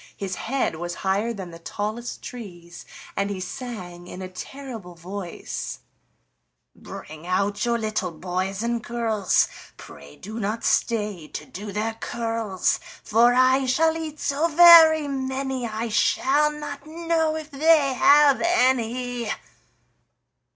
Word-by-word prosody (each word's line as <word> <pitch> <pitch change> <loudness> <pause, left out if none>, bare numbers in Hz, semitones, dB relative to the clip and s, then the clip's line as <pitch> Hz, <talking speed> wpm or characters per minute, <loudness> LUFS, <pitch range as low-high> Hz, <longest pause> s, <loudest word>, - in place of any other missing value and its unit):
His 195 -2 -4
head 260 -6 -2
was 175 +1 -4
higher 200 +5 +1
than 190 -6 -7
the 165 - -11
tallest 215 +7 -5
trees, 175 -8 -9 0.3
and 200 0 -1
he 200 -2 -4
sang 180 -4 -7
in 185 +1 -8
a - - -5
terrible 220 -1 -9
voice: 180 +1 -6 1.0
"Bring 155 +2 -10
out 200 +4 0
your 235 0 +1
little 215 -4 -2
boys 185 +4 -3
and 235 -1 -1
girls, 225 -5 +1 0.3
Pray 70 0 -13
do 215 +4 -8
not 215 +2 -2
stay 210 -8 0
to - - -7
do 205 +2 -8
their 215 +3 -2
curls, 225 -4 -1 0.2
For 235 +3 +4
I 260 +1 +4
shall 320 +5 +3
eat 310 -2 -6
so 290 +4 +1
very 325 -2 +8
many, 265 -2 -3
I 225 +1 -3
shall 285 +6 +2
not 295 -1 -7
know 325 -1 0
if 315 -1 -7
they 290 -1 +4
have 285 +2 +5
any." 250 -7 +1
230 Hz, 130 wpm, -24 LUFS, 195-275 Hz, 1.0 s, very